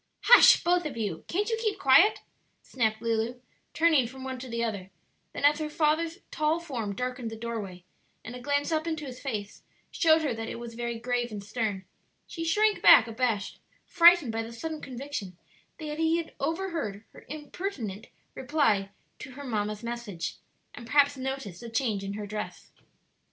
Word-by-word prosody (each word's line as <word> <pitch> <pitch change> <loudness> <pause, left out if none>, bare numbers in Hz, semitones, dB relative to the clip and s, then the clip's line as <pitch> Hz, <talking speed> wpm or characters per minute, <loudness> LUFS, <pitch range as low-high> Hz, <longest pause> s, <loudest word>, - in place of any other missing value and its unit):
"Hush, 485 - +8
both 350 -1 +2
of 265 -5 -8
you! 200 -8 -3
can't 410 +4 -1
you 450 - +1
keep 425 -2 0
quiet?" 345 +7 +5 0.4
snapped 220 -3 -1
Lulu, 230 +2 -1 0.4
turning 315 -6 +4
from 260 +2 -10
one 260 -1 -5
to 255 0 -8
the 235 0 -2
other; 200 -5 -3 0.4
then - - -2
as 295 +1 +5
her 305 -1 -3
father's 320 +2 +1
tall 310 +2 +1
form 240 -12 -4
darkened 250 -1 -3
the 225 - -7
doorway, 220 -6 -6 0.4
and 245 - -7
a - - -7
glance 285 +4 -1
up 315 +1 0
into 315 -2 -3
his 255 -2 -8
face 215 -7 -5 0.3
showed 320 -1 +4
her 285 -5 0
that 225 0 -5
it - - -5
was 235 0 -8
very 235 0 -4
grave 245 0 -2
and 205 -2 -6
stern, 205 -3 -3 0.4
she 330 -5 -6
shrank 420 +6 +2
back 225 - +8
abashed, 225 -3 -2 0.3
frightened 345 -7 +6
by 225 0 -2
the 225 +1 -7
sudden 310 +6 -6
conviction 250 -8 -6 0.4
that 305 -1 -6
he 325 +1 +2
had 335 -1 -5
overheard 325 - -3
her - - -14
impertinent 295 - -5 0.3
reply 255 -9 +1 0.3
to 260 - -9
her 285 +2 -9
mamma's 210 -3 -3
message, 230 -8 -5 0.4
and 235 - -10
perhaps 285 +1 +4
noticed 265 -9 -5
the 235 - -7
change 225 -4 -1
in 195 0 -4
her 210 0 -5
dress. 210 +1 -7
250 Hz, 180 wpm, -28 LUFS, 225-310 Hz, 0.4 s, Hush